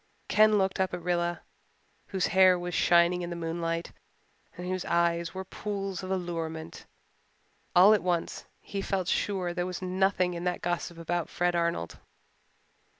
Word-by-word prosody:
Ken 215 0 +5
looked 190 -1 0
up 190 -1 0
at 180 - -7
Rilla, 175 -1 0 0.7
whose 190 -2 -1
hair 185 -1 +6
was 175 0 -5
shining 175 +1 +4
in 175 - -4
the 170 - -4
moonlight 165 0 -3 0.7
and 180 - -6
whose 185 0 -2
eyes 170 0 0
were 190 0 -5
pools 195 -1 -4
of 185 - -7
allurement. 165 -4 -4 0.9
All 190 +4 +8
at 210 - +2
once 175 -2 -2 0.2
he 200 - -5
felt 190 -2 -2
sure 185 -2 0
there 175 0 -2
was 180 -1 -5
nothing 185 0 +1
in 170 0 -5
that 180 - -2
gossip 175 0 -2
about 170 0 -2
Fred 175 0 0
Arnold. 170 - -1
180 Hz, 155 wpm, -28 LUFS, 170-190 Hz, 0.9 s, All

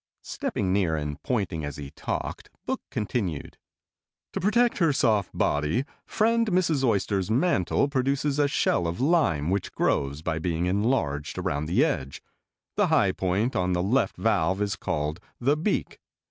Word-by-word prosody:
Stepping 95 -1 -2
near 90 -5 +2
and 75 -1 -4
pointing 100 - -1
as 75 0 -5
he 70 -1 -7
talked, - - -4 0.2
Book - - -2
continued: 100 - -3 0.7
"To - - -2
protect 235 +5 +2
her 165 -4 +4
soft 110 -8 +2
body, 75 - 0 0.2
friend 230 +1 +2
Mrs. 170 -7 +1
Oyster's 100 -4 +1
mantle 125 - +2
produces 140 +1 0
a 145 - +4
shell 90 - +1
of 85 +5 -4
lime 130 - +2
which 100 -1 -1
grows 70 +2 0
by 80 -1 -1
being 85 +1 -1
enlarged 90 - 0
around 70 +2 -2
the 85 - +3
edge. 70 0 -3 0.6
The - - +4
high - - +3
point 95 +7 -1
on 90 0 +1
the 90 0 0
left 120 +8 +1
valve 95 -4 +1
is 100 -1 0
called 75 +3 -2 0.2
the 140 +4 +3
beak. 165 +7 -2
100 Hz, 155 wpm, -26 LUFS, -, 0.7 s, her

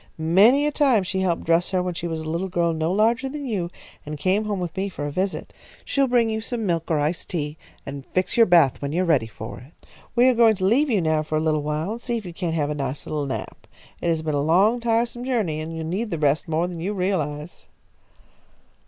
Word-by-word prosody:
Many 200 - +5
a 295 - +1
time 270 -9 +3
she 190 +1 -2
helped 180 -3 0
dress 165 +2 +2
her 185 -1 0
when 180 0 -2
she 170 0 -4
was 160 -1 -3
a 160 - -7
little 170 +4 -2
girl 170 -2 0
no 160 +1 -1
larger 230 +7 +2
than 290 +1 -6
you, 195 -8 -2 0.3
and 150 0 -6
came 190 +8 +1
home 205 -2 -2
with 175 -2 -4
me 195 +1 -2
for 145 -6 -5
a 145 - -3
visit. 185 +5 -3 0.3
She'll 275 -1 +1
bring 240 -2 +3
you 220 0 -2
some 225 0 -3
milk 165 -3 -1
or 160 - +2
iced 150 +4 -2
tea, 150 -3 -3 0.3
and 140 0 -6
fix 185 0 -1
your 230 -1 +6
bath 170 -7 +4
when 140 +1 -3
you 180 +3 +1
are - - -1
ready 145 -9 +2
for 110 +3 -8
it. 130 +7 -18 0.3
We 245 +1 +5
are 255 - +5
going 230 -2 +5
to 185 -1 -2
leave 270 +9 +3
you 210 -6 +2
now 155 -1 +1
for 155 0 -2
a - - +2
little 155 -1 +1
while 150 +5 -2
and 230 +2 -5
see 240 -1 -2
if 220 - -7
you 175 - -7
can't 165 -2 -2
have 150 -2 0
a - - 0
nice 140 -1 -4
little 150 -2 -2
nap. 135 - -6 0.3
It - - -2
has 160 -1 0
been 155 -1 -1
a 145 - +1
long, 190 +10 +3
tiresome 235 +1 0
journey, 220 -12 -1
and 160 +1 -5
you 160 - -4
need 190 +8 -2
the 170 - -2
rest 150 +1 +1
more 160 +1 0
than 175 -2 -6
you 190 +5 -2
realise." 170 -5 -3
175 Hz, 255 wpm, -23 LUFS, 155-220 Hz, 0.3 s, your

